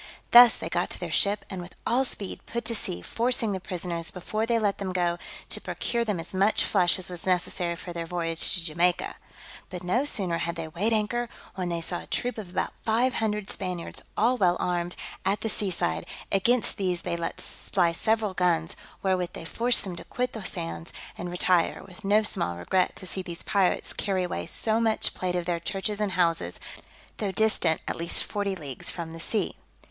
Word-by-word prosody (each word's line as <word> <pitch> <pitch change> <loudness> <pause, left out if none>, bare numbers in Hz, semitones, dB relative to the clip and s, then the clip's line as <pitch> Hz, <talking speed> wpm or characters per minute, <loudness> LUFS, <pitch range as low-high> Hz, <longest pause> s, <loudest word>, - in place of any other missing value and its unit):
Thus 240 -1 +10
they - - -4
got - - 0
to - - -6
their - - -4
ship, 205 0 +2
and 190 -3 -5
with 175 +1 -10
all 255 +3 +3
speed 200 -6 -3
put 235 +1 -3
to 230 - +2
sea, 90 - -2
forcing 235 - +1
the 190 - -2
prisoners, 175 -2 -3
before 215 +5 -2
they 235 -1 +3
let 205 -3 +1
them 190 -2 -3
go, 175 -1 +1 0.3
to - - -1
procure 235 -1 -1
them 210 -6 -1
as 165 - -6
much 195 +3 +3
flesh 180 -3 +3
as 185 - -6
was 180 0 -7
necessary 175 -1 0
for 175 +1 -8
their 170 -1 -4
voyage 165 0 +1
to 180 - 0
Jamaica. 175 +2 +1 0.5
But 180 -2 -6
no 210 +9 +2
sooner 185 -11 +1
had 170 0 -2
they 165 -1 -4
weighed 180 +8 0
anchor, 230 +2 +1 0.2
when 180 -2 -3
they 170 -1 -2
saw 175 +1 +1
a - - -11
troop 245 -2 -1
of 200 -4 -7
about 185 - -2
five 240 +4 +2
hundred 210 -2 -1
Spaniards, 180 -3 -4 0.2
all 245 +4 +3
well 180 -2 +4
armed, 175 0 -1 0.3
at 195 +2 +1
the 225 - 0
sea 205 -2 +2
side: 85 - -1 0.2
against 235 +4 +3
these 180 -3 -1
they - - -1
let 170 0 -3
fly 175 -4 0
several 215 +3 +1
guns, 175 -1 +1 0.3
wherewith 185 -2 +1
they - - -7
forced 235 +7 +3
them 185 -3 -5
to - - -7
quit 250 0 -2
the 220 - -6
sands, 165 -2 -5 0.2
and 175 - -5
retire, 180 -1 +2
with 180 -2 -14
no 210 +2 +4
small 85 - +1
regret 180 - +1
to 190 - -9
see 190 +1 -2
these 170 -2 -5
pirates 195 -3 +1
carry 190 -2 0
away 85 - -3
so 220 0 +1
much 225 -1 +2
plate 180 -1 -2
of 175 -1 -1
their 175 -1 0
churches 200 +4 -2
and 205 -3 0
houses, 165 - +1 0.6
though 205 -3 -1
distant 190 -6 +2
at - - -1
least 170 0 +1
forty 200 -2 -2
leagues 145 -7 -5
from 170 -2 -5
the 165 - -8
sea. 215 +6 -1
185 Hz, 205 wpm, -27 LUFS, 170-215 Hz, 0.6 s, Thus